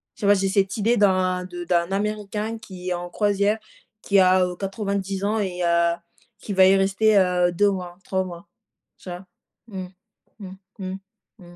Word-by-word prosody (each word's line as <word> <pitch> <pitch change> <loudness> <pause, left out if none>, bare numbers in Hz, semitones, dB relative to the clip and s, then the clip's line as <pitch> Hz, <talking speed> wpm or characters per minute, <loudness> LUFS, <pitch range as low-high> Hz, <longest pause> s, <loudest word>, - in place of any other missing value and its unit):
tu - - -5
vois, 200 - +6
j'ai 195 -1 +1
cette 195 0 +1
idée 225 +3 +2
d'un 185 -3 +2
de 175 -1 -7
d'un 170 +1 +1
Américain 210 +2 -2
qui 185 -5 -8
est - - +1
en 175 0 -5
croisière, 205 +2 +1 0.4
qui 200 -1 +3
a, 185 0 +5
heu, 180 0 -4
90 195 0 -3
ans 215 +2 0
et 180 -3 -3
heu, 170 0 +3 0.5
qui 205 - -5
va 190 0 +6
y 195 - +6
rester, 195 +2 +3
heu, 180 -1 +3
2 205 +4 +3
mois, 180 -2 -6
3 190 -1 -1
mois. 180 +1 -9 0.5
Tu - - -11
vois? 180 +2 -7 0.4
Mmh. 190 -4 -6 0.5
Mmh. 190 -3 -8 0.3
Mmh. 190 -1 -4 0.4
Mmh. 175 -2 -15
190 Hz, 180 wpm, -23 LUFS, 180-205 Hz, 0.5 s, vois